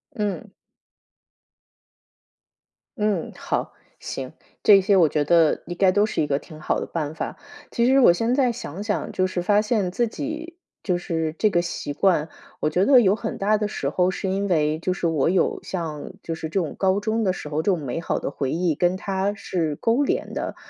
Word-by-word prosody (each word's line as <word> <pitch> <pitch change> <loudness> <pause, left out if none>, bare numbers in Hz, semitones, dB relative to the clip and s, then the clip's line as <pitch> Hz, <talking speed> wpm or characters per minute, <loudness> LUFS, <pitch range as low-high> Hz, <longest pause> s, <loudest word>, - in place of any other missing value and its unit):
嗯。 210 -2 -3 2.5
嗯， 210 -5 0
好， - - -3 0.3
行， 130 +1 -6 0.3
这 200 -2 +7
些 195 +1 +3
我 170 -4 +6
觉 150 0 0
得 165 +1 +3
应 175 - -6
该 190 -1 +4
都 205 +2 +3
是 - - -1
一 150 - 0
个 140 -1 +1
挺 155 -1 -13
好 155 - -1
的 - - -3
办 155 -2 -4
法。 - - -5 0.3
其 235 - +1
实 265 +2 +5
我 240 - +7
现 230 +8 +1
在 260 -3 +3
想 200 -5 -6
想， 205 -8 -2
就 185 - +1
是 185 -1 -3
发 205 +3 +3
现 210 -4 0
自 235 +6 +1
己 315 +7 -6 0.3
就 180 -3 +1
是 160 -3 -2
这 215 - +4
个 175 - +2
习 160 -4 -4
惯， 165 -1 +2 0.3
我 150 - +1
觉 180 +5 +2
得 260 0 +7
有 200 -3 +4
很 225 0 -5
大 210 +2 +2
的 210 0 -1
时 140 -9 -2
候 180 +4 +1
是 190 - -3
因 195 +2 -1
为 155 -2 +1
就 185 - -1
是 175 - -1
我 160 -2 +1
有 185 +1 +1
像 160 -5 -5
就 165 - -3
是 160 -1 -5
这 195 - 0
种 165 -5 -3
高 190 +1 +2
中 220 +2 -1
的 190 - +2
时 180 - -7
候， 150 +1 -1
这 200 - +2
种 180 - 0
美 140 +4 -3
好 - - -1
的 - - -4
回 135 -2 -2
忆 170 -2 0
跟 175 +4 +1
它 195 +1 -1
是 170 -6 -2
勾 235 +5 +2
连 - - -2
的。 - - -4
185 Hz, 225 characters per minute, -23 LUFS, 160-210 Hz, 2.5 s, 这